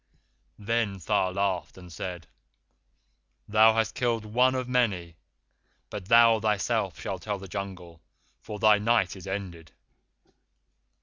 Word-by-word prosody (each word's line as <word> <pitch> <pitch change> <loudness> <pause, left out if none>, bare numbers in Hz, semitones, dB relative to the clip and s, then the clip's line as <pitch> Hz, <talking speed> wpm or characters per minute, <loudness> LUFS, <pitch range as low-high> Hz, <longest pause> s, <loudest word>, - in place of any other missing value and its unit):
"Then 110 -1 -1
Tha 95 +1 0
laughed, 95 -3 -2
and 90 -2 -12
said: 90 -1 -6 1.2
'Thou 110 +1 +5
hast 115 -2 0
killed 115 -3 -1
one 125 +4 +2
of 130 -1 -2
many, 100 -10 0 0.8
but 100 -3 -7
thou 115 0 +6
thyself 105 -5 -1
shalt 95 +4 -5
tell 105 -2 -3
the 95 0 -10
Jungle 90 -4 -7 0.4
for 105 - -8
thy 105 0 +5
Night 105 -3 +1
is 95 0 -11
ended. 90 -4 -6
100 Hz, 125 wpm, -27 LUFS, 90-115 Hz, 1.2 s, thou